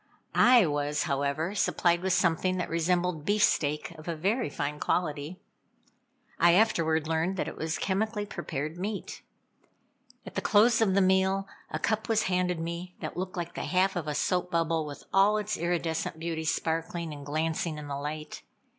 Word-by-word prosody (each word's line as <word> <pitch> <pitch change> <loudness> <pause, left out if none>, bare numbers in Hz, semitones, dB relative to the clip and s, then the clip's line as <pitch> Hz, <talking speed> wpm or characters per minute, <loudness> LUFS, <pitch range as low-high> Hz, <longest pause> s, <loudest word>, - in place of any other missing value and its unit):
I 245 -4 +6
was, 145 -1 0
however, 140 +4 -1
supplied 175 -4 +2
with 190 0 0
something 180 +2 +2
that 180 - -3
resembled 170 -1 0
beefsteak 155 -6 +1
of 155 - -12
a 170 - -2
very 200 - 0
fine 145 +1 -3
quality. 155 0 -1 1.0
I 170 0 +6
afterward 160 -6 +2
learned 165 +4 0
that - - -1
it - - -6
was 160 0 -2
chemically 210 +2 -1
prepared 155 -4 -5
meat. 205 +2 -4 1.0
At - - -9
the - - -2
close 225 +2 +4
of 195 -4 +3
the 200 - +5
meal, 190 +1 +2 0.2
a - - -3
cup 220 0 -1
was 220 -1 +3
handed 180 -2 0
me 170 +2 -5
that - - -5
looked 185 0 -4
like 175 0 -4
the - - -4
half 190 +1 +2
of 170 -4 -3
a 150 - -2
soap 180 +4 0
bubble 165 -2 0
with 145 - -8
all 200 +2 +5
its 210 0 -2
iridescent 165 -2 -1
beauty 160 -1 -3
sparkling 165 0 -2
and 145 -1 -9
glancing 155 +2 -1
in 150 -1 -7
the 140 - -3
light. 150 +2 -5
170 Hz, 170 wpm, -28 LUFS, 155-190 Hz, 1.0 s, I